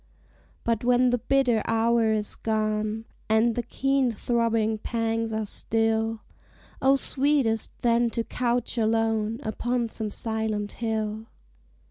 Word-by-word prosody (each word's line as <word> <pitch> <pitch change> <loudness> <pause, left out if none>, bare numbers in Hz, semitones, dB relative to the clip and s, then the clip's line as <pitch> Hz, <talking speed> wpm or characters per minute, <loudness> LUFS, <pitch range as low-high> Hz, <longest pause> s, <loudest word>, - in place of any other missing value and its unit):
But 230 0 0
when 250 0 +4
the 245 - +1
bitter 245 -2 +2
hour 225 0 +2
is 210 -1 0
gone, 215 0 -1 0.2
And 220 +2 +3
the 240 - -1
keen 270 +1 +1
throbbing 230 -1 0
pangs 225 0 -1
are 220 0 -2
still, 225 +1 0 0.6
Oh 270 +1 +5
sweetest 270 -5 +1
then 235 0 +3
to 230 0 -2
couch 245 0 -1
alone 225 0 +1
Upon 240 +1 -1
some 220 -1 -3
silent 220 -1 -2
hill! 220 -1 -3
225 Hz, 120 wpm, -26 LUFS, 220-240 Hz, 0.6 s, Oh